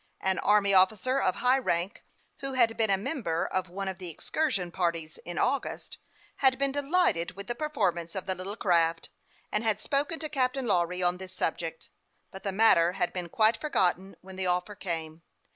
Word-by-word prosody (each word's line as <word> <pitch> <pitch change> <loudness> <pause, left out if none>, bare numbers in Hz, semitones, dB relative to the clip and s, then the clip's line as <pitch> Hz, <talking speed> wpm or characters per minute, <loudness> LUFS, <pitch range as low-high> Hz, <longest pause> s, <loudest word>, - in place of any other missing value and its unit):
An 190 -1 +1
army 205 -1 +3
officer, 215 +8 +3
of 185 - +1
high 250 +2 +3
rank, 180 -4 -2 0.3
who 275 -1 -3
had 235 -3 +3
been 220 -2 +2
a 195 - +3
member 195 - -2
of 185 -1 -2
one 195 +2 -5
of 190 0 -5
the 180 -2 -7
excursion 195 - -2
parties 165 -3 -2
in 175 0 -6
August, 270 +2 -2 0.4
had 265 -2 +4
been 275 0 +1
delighted 285 - +1
with 200 0 -7
the 240 - -2
performance 180 - -2
of 190 - -2
the 190 - +1
little 185 +3 -5
craft, 165 -4 +1 0.4
and 210 - -1
had 215 -2 +1
spoken 290 +7 -1
to 315 - -2
Captain 265 -2 0
Lawry 180 -3 +1
on 175 0 +1
this 185 0 -9
subject; 165 -1 -3 0.4
but 190 - -9
the 195 - -2
matter 185 -4 +4
had 180 - -1
been 180 -2 -4
quit3 220 +4 +3
forgotten 190 - 0
when 190 0 -11
the 190 -1 -1
offer 180 +3 0
came. 165 -5 -5
190 Hz, 190 wpm, -28 LUFS, 175-250 Hz, 0.4 s, had